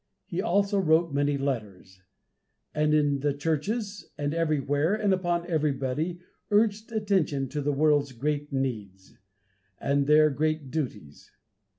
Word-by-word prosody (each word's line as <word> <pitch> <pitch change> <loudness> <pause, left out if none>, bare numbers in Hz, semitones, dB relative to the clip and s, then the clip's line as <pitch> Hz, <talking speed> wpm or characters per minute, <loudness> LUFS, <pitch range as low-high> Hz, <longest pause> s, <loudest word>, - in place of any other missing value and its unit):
He 180 +1 -3
also 200 +2 +1
wrote 160 -3 +2
many 145 0 +1
letters; 105 -9 -4 0.7
and 150 0 +1
in 145 -2 +2
the 145 0 0
churches, 195 - -2
and 145 0 -2
everywhere, 155 +1 +1
and 210 -3 +1
upon 175 -2 0
everybody, 155 +1 -1 0.3
urged 215 +1 +2
attention 190 -11 0
to 150 +1 -3
the 145 +1 0
world's 145 -1 +2
great 145 +3 -2
needs, 105 -9 -4 0.6
and 140 0 +1
their 155 0 +6
great 155 -1 -1
duties. 105 - -5
150 Hz, 125 wpm, -27 LUFS, 140-175 Hz, 0.7 s, their